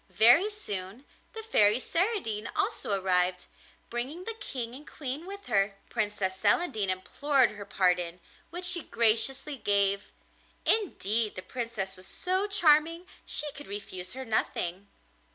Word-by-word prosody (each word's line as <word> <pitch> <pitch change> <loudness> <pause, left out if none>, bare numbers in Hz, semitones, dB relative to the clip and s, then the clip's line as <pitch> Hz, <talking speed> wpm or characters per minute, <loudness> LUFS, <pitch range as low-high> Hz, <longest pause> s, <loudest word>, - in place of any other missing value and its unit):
Very 270 - +6
soon 210 - -6 0.3
the 445 - -7
Fairy 215 - +4
Saradine 330 - -1
also 400 - -1
arrived, 180 -1 +1 0.5
bringing 260 +9 -4
the 455 - -4
King 260 - -5
and 285 +4 -9
Queen 290 +4 -5
with 400 +1 -9
her. 200 -3 +1 0.2
Princess 205 -4 -1
Celandine 215 - +2
implored 260 +8 +1
her 205 -1 -9
pardon, 180 -3 0 0.3
which 355 +3 -4
she 355 -1 +5
graciously 265 +6 +1
gave; 200 -2 +1 0.5
indeed 230 - +2
the 185 - -5
Princess 230 -6 -4
was 185 0 -11
so 375 +2 0
charming 330 -3 +3 0.2
she 295 -1 0
could 290 +1 -11
refuse 190 -3 -4
her 265 +1 -6
nothing. 200 -4 -2
235 Hz, 135 wpm, -28 LUFS, 200-330 Hz, 0.5 s, Very